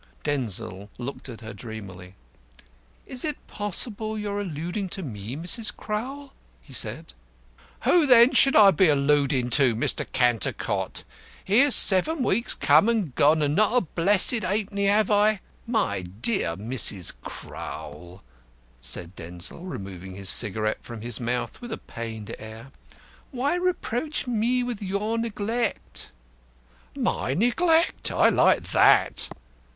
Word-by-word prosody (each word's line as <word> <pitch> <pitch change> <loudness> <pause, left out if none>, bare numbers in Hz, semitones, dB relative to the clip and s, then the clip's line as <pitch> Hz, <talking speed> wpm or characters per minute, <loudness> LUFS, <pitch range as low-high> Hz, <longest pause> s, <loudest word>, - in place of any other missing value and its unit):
Denzil 105 -8 -2
looked 130 +2 -7
at 115 -2 -9
her 110 0 -8
dreamily. 100 -4 -10 0.9
"Is 250 - -2
it 300 -2 -2
possible 215 +2 -2
you 210 -1 -4
are 205 0 -3
alluding 175 +2 -5
to 190 - -6
me, 110 -3 -7
Mrs. 180 +8 +1
Crowl?" 265 +6 -6 0.3
he - - -17
said. - - -4 0.7
"Who 340 -4 +3
then 245 0 +7
should 270 +1 +5
I 205 -2 +8
be 185 +1 +3
alludin' 140 -3 +1
to, 130 -2 +3
Mr. 115 - 0
Cantercot? 120 -3 -1 0.4
Here's 250 +8 +5
seven 255 - +6
weeks 235 +1 0
come 155 +9 +4
and 210 - -1
gone, 150 +3 +3
and 145 0 0
not 215 +7 +2
a - - +4
blessed 200 +6 +2
'aypenny 200 +1 -2
have 210 +1 +2
I 210 0 +3 0.2
" - - -33
"My 100 - 0
dear 95 - -2
Mrs. 105 -4 +1
Crowl," 85 +6 -9 0.6
said 85 +10 -5
Denzil, 90 - -7
removing 95 - -8
his 100 -1 +4
cigarette 110 0 +3
from 115 -3 -9
his 120 -1 -2
mouth 120 - -4
with 240 -1 -8
a - - -3
pained 115 -2 -8
air, 110 +4 -11 0.6
"why 275 +3 -1
reproach 320 -6 -2
me 245 +1 0
for 205 - -10
your 205 +4 -2
neglect?" 230 +1 -3 0.8
"My 130 - -1
neglect! 320 - +1
I - - +4
like - - +3
that!" - - +3
175 Hz, 135 wpm, -25 LUFS, -, 0.9 s, I